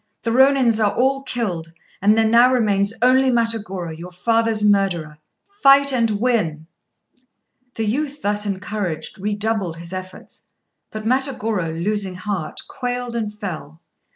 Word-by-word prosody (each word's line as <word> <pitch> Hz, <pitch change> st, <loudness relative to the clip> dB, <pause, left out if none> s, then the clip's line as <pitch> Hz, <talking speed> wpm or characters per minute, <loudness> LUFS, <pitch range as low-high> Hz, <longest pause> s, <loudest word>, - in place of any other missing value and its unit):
The 230 Hz, -, -1 dB
Rônins 255 Hz, -3 st, +4 dB
are 205 Hz, -, +1 dB
all 270 Hz, +2 st, +2 dB
killed, 180 Hz, -11 st, -3 dB, 0.3 s
and 210 Hz, +3 st, +4 dB
there 225 Hz, -, +4 dB
now 235 Hz, +3 st, +5 dB
remains 205 Hz, -5 st, +2 dB
only 260 Hz, +1 st, +4 dB
Matagorô, 215 Hz, -8 st, -1 dB
your 175 Hz, +3 st, -9 dB
father's 225 Hz, +3 st, +1 dB
murderer. 180 Hz, -7 st, +1 dB, 0.4 s
Fight 275 Hz, 0 st, +6 dB
and 230 Hz, -3 st, +2 dB
win!" 175 Hz, -11 st, 0 dB, 1.1 s
The 225 Hz, -, -2 dB
youth, 290 Hz, +6 st, -2 dB
thus 205 Hz, 0 st, 0 dB
encouraged, 195 Hz, -2 st, -4 dB
redoubled 205 Hz, -3 st, -1 dB
his 170 Hz, +2 st, -9 dB
efforts; 185 Hz, 0 st, -9 dB, 0.5 s
but 215 Hz, 0 st, -7 dB
Matagorô, 225 Hz, -, 0 dB
losing 200 Hz, -2 st, -1 dB
heart, 185 Hz, -4 st, -4 dB
quailed 245 Hz, -1 st, -4 dB
and 220 Hz, -3 st, -2 dB
fell. 180 Hz, -7 st, -7 dB
215 Hz, 130 wpm, -21 LUFS, 185-240 Hz, 1.1 s, Fight